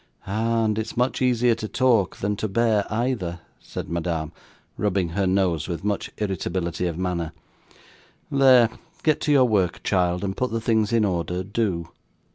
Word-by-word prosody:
'Ah! 115 +3 0
and 110 0 0
it's 110 - -5
much 125 +2 +1
easier 125 -1 +3
to 110 -1 -4
talk 115 -8 +2
than 105 +1 -1
to 110 - -2
bear 110 -1 +1
either,' 110 -7 -1 0.2
said - - -7
Madame, 85 -2 -2 0.4
rubbing 95 -4 0
her 95 +3 0
nose 90 -5 +1
with 85 -1 -4
much 105 -1 -1
irritability 90 -3 -2
of 85 -2 -4
manner. 85 -3 -2 1.0
'There, 130 -4 +6 0.3
get 155 -2 +2
to 150 - +1
your 135 -3 +6
work, 100 -7 +1
child, 90 -1 +1
and 95 -1 -2
put 125 - -1
the 115 - -2
things 110 -1 +1
in 115 -2 +3
order, 90 -1 -1
do. 95 -4 -2
100 Hz, 165 wpm, -24 LUFS, 90-115 Hz, 1.0 s, There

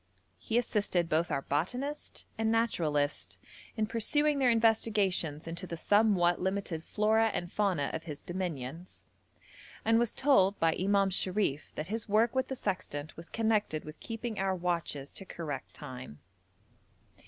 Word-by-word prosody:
He 225 - -1
assisted 205 -7 +1
both 165 +1 +1
our 135 - -1
botanist 250 - -3
and 225 0 +1
naturalist 160 -11 0 0.4
in 215 - +2
pursuing 290 +7 +1
their 260 -2 +4
investigations 210 -9 +2
into 170 +3 -5
the 170 - -5
somewhat 195 -3 +3
limited 190 -4 -2
flora 220 +3 +2
and 175 0 -3
fauna 190 -9 +1
of 160 0 -4
his 150 -4 -7
dominions, 175 -2 -5 0.8
and 225 +1 +4
was 235 -2 +1
told 205 -8 +3
by 165 -1 +3
Imam 195 +1 +2
Sharif 185 -6 +1
that 155 - -3
his 225 -1 -4
work 220 +3 +3
with 260 0 0
the 265 - -3
sextant 180 - -3
was 165 0 -10
connected 215 -8 0
with 155 +1 -10
keeping 225 -2 -5
our 190 -1 +1
watches 170 -6 -2
to - - -5
correct 150 -7 -6
time. 130 - -8
190 Hz, 145 wpm, -31 LUFS, 160-225 Hz, 0.8 s, their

